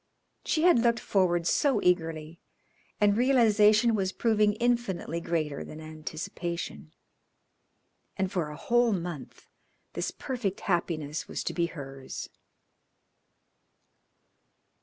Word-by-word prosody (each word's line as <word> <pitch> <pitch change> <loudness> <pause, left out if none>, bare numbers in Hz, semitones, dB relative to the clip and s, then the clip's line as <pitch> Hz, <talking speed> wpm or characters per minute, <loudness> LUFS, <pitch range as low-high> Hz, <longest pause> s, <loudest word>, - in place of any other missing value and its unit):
She 315 - 0
had 350 -8 +6
looked 235 0 +2
forward 175 -4 +1
so 265 - +2
eagerly, 165 -2 0 0.6
and 205 -1 +4
realisation 230 -2 +4
was 190 -3 0
proving 215 -2 +2
infinitely 235 -8 -1
greater 155 -4 -2
than 155 - -9
anticipation. 160 +2 -6 1.3
And 190 -1 -1
for 170 -6 -1
a 150 - -8
whole 240 +4 +2
month 170 -6 -6 0.5
this - - -2
perfect 240 -8 -4
happiness 165 -4 -2
was - - -4
to - - -3
be 170 -1 +1
hers. 135 -4 -8
185 Hz, 105 wpm, -28 LUFS, 165-230 Hz, 1.3 s, had